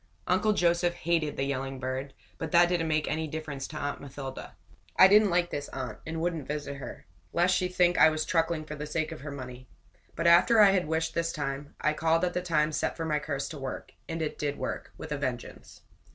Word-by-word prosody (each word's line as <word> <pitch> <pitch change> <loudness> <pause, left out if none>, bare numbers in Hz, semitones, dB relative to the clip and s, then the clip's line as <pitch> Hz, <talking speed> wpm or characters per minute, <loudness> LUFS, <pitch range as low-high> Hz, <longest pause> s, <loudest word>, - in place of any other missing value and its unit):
Uncle 185 +4 +2
Joseph 175 -1 +2
hated 165 -3 0
the 135 - 0
yelling 135 -1 -3
bird, 130 +1 -4 0.2
but 160 -2 -4
that 175 0 +6
didn't 175 -2 0
make 155 -1 0
any 160 +1 -1
difference 150 -3 -5
to 155 - -8
Aunt 145 -1 -3
Mathilda. 135 -1 -8 0.4
I 190 - +10
didn't 210 +1 +6
like 175 0 +1
this 145 0 -4
aunt, 130 -1 -6
and 160 0 -3
wouldn't 165 -4 -2
visit 145 -1 -4
her, 140 - -9 0.3
lest 175 +1 +3
she 180 - +1
think 180 -1 +2
I 160 - +8
was 155 0 -2
truckling 165 -1 0
for 150 - -7
the 150 0 -6
sake 155 +1 -2
of 160 - -8
her 145 - -6
money; 130 -2 -8 0.5
but 165 - -3
after 175 +7 +6
I 205 -2 +8
had 185 -4 +1
wished 160 0 -1
this 165 0 0
time, 145 -1 -4
I 150 - +1
called 165 +2 +2
at 175 - -2
the 180 - -1
time 155 -3 +1
set 150 - -2
for 165 - -3
my 150 -1 +1
curse 145 -2 -3
to 155 - -7
work; 135 -1 -6 0.2
and 165 0 -2
it 155 - -4
did 145 -1 -2
work - - -4
with 155 - -8
a 150 - -1
vengeance. 130 -3 -5
155 Hz, 225 wpm, -29 LUFS, 145-170 Hz, 0.5 s, I